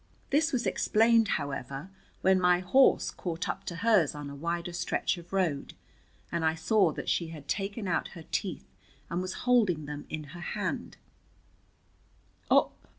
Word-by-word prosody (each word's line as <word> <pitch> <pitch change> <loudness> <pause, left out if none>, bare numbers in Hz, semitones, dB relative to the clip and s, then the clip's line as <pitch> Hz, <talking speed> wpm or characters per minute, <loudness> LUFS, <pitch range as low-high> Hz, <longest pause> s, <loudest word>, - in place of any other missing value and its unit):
This 300 +2 +3
was 245 -3 0
explained, 225 0 +3
however, 140 +3 -5 0.3
when 190 0 +4
my 180 0 +5
horse 220 +10 +4
caught 170 -1 -4
up 195 - -4
to 175 - -4
hers 190 -5 +3
on 145 -1 -6
a - - -8
wider 170 +3 -3
stretch 175 - 0
of 170 - -15
road, 175 -8 -1 0.6
and 170 -1 -1
I 160 0 +2
saw 190 +1 +3
that - - -6
she 170 - +1
had 155 -3 -10
taken 200 +1 -2
out 175 - 0
her 165 - -9
teeth 195 -4 -2 0.5
and 175 +1 0
was 185 0 -3
holding 210 -11 +3
them 145 0 -7
in 155 -1 -4
her 175 - -8
hand. - - -3
175 Hz, 155 wpm, -29 LUFS, 160-200 Hz, 0.6 s, my